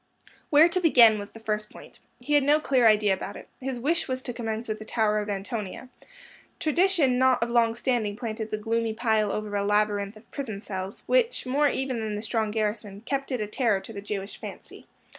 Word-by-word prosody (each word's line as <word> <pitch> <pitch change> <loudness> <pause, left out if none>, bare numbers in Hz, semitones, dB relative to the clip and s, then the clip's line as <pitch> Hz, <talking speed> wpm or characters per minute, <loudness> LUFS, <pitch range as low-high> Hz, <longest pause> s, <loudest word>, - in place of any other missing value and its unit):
Where 305 +2 +7
to 345 +2 0
begin 235 -11 +6
was 205 0 -7
the 225 - -11
first 215 -1 -2
point. - - -14 0.2
He 295 - -3
had 290 - +6
no 295 +2 +4
clear 260 -6 +3
idea 210 -2 +4
about 190 +1 -5
it. - - -12
His 265 -1 -4
wish 325 +7 0
was 260 -1 -3
to 245 - -4
commence 225 -1 -4
with 215 -1 -3
the - - -7
Tower 215 -1 +1
of 210 0 -4
Antonia. 205 +3 -5 0.7
Tradition 315 -6 +2
not 260 -2 +4
of 235 - -3
long 230 -1 +3
standing 235 -5 -1
planted 220 -1 -5
the 215 - -2
gloomy 225 +1 -1
pile 220 -3 +1
over 210 -1 -3
a 200 - 0
labyrinth 205 0 0
of 215 - -20
prison 225 -8 -5
cells, 190 -1 -6
which, - - +1
more 285 +4 +2
even 260 -3 -2
than 215 -1 -3
the 210 - -5
strong 220 -1 -1
garrison, 210 -2 -3
kept 275 +3 -3
it 250 -4 -1
a - - -1
terror 210 -1 +1
to 225 - -10
the 200 - -6
Jewish 200 0 -5
fancy. - - -10
225 Hz, 215 wpm, -26 LUFS, 210-260 Hz, 0.7 s, Where